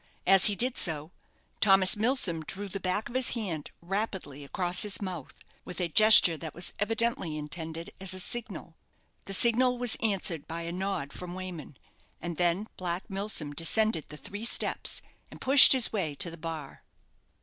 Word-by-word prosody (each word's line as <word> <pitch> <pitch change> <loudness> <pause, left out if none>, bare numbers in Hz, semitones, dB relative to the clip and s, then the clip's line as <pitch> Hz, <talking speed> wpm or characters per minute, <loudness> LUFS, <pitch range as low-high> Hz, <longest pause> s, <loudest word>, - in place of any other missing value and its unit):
As 195 0 +6
he 205 - 0
did 250 +4 +1
so, 155 -1 -2 0.5
Thomas 195 -2 +4
Milsom 210 -7 +1
drew 195 +6 -6
the 195 +1 -6
back 185 +3 -2
of 240 - -12
his 255 -1 0
hand 180 -10 -5
rapidly 185 -7 -4
across 175 +5 +1
his 210 -1 +1
mouth, 180 -8 -8 0.2
with 180 - -9
a 175 -2 -2
gesture 210 -3 +6
that 160 -1 -8
was 175 - -3
evidently 225 - -1
intended 160 +2 -5
as 190 -1 -3
a - - -5
signal. 200 -5 -4 0.5
The 195 - -3
signal 245 +4 +2
was 245 -2 +1
answered 190 -8 -2
by 165 +1 -6
a 170 - -5
nod 180 -6 -4
from 180 0 -8
Wayman, 180 -7 -8 0.4
and 170 -2 -6
then 175 +3 0
Black 180 0 -4
Milsom 195 -7 -2
descended 165 +3 0
the 150 - -10
three 205 +9 -8
steps, 235 - +1 0.3
and - - -13
pushed 270 +1 +8
his 255 -4 +5
way 165 -9 -2
to 170 - -1
the - - -9
bar. 160 -3 -7
185 Hz, 170 wpm, -28 LUFS, 165-215 Hz, 0.5 s, pushed